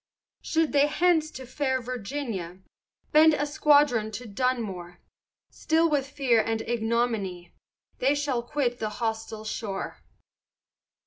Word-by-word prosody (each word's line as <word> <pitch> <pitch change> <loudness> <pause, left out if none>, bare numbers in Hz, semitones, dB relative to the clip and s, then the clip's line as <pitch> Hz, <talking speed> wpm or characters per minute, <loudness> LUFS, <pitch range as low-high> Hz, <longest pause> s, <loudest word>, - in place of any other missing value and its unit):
Should 320 -1 0
they 285 0 +4
thence 335 -3 +3
to 260 -4 -9
fair 260 +1 -1
Virginia, 235 -7 -5 0.5
Bend 310 0 +6
a 290 - -1
squadron 290 -6 +3
to 245 +4 -6
Dunmore, 200 -7 -2 0.5
Still 325 +1 +2
with 280 -2 +1
fear 260 -6 +2
and 225 0 -2
ignominy, 225 -6 -1 0.5
They 275 +3 +3
shall 285 -4 -1
quit 245 -1 -2
the 215 - -2
hostile 220 -1 -3
shore. 210 -2 -5
245 Hz, 120 wpm, -27 LUFS, 220-290 Hz, 0.5 s, Bend